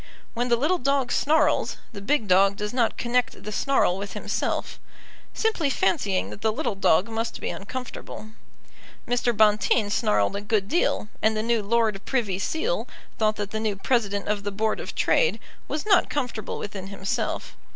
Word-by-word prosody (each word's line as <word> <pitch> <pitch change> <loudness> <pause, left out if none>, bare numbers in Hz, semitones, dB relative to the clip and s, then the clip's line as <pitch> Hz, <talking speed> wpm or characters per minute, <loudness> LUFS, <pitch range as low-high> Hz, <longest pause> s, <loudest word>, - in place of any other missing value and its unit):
When 245 +1 -1
the 240 - +5
little 310 +9 +1
dog 275 -1 +1
snarls, 300 +1 +2
the 200 - -8
big 255 +1 +1
dog 195 +1 +5
does 210 +2 -4
not 240 -3 +1
connect 245 0 0
the 210 - -5
snarl 210 -6 +2
with 200 0 -6
himself, - - -2 0.5
simply 435 -10 0
fancying 250 - 0
that 205 - -9
the 220 - +2
little 260 +1 -2
dog 195 0 +3
must 225 0 -3
be - - -3
uncomfortable. 220 0 -7 0.8
Mr. 245 0 +1
Bonteen 210 0 +3
snarled 105 - +2
a 200 - -3
good 205 -1 0
deal, 235 -6 +1
and 220 0 +2
the 215 - -1
new 230 -1 +1
Lord 215 -1 +1
Privy 215 -8 -1
Seal 435 - -1 0.3
thought 215 -1 +2
that 205 -1 -4
the 220 - -2
new 215 -2 -1
President 200 -2 0
of 210 -1 0
the 205 0 -3
Board 215 +2 0
of - - -6
Trade 485 - +2 0.3
was 300 - -3
not 390 -4 +4
comfortable 245 -7 -3
within 195 -2 -6
himself. 195 0 -3
220 Hz, 170 wpm, -25 LUFS, 200-255 Hz, 0.8 s, the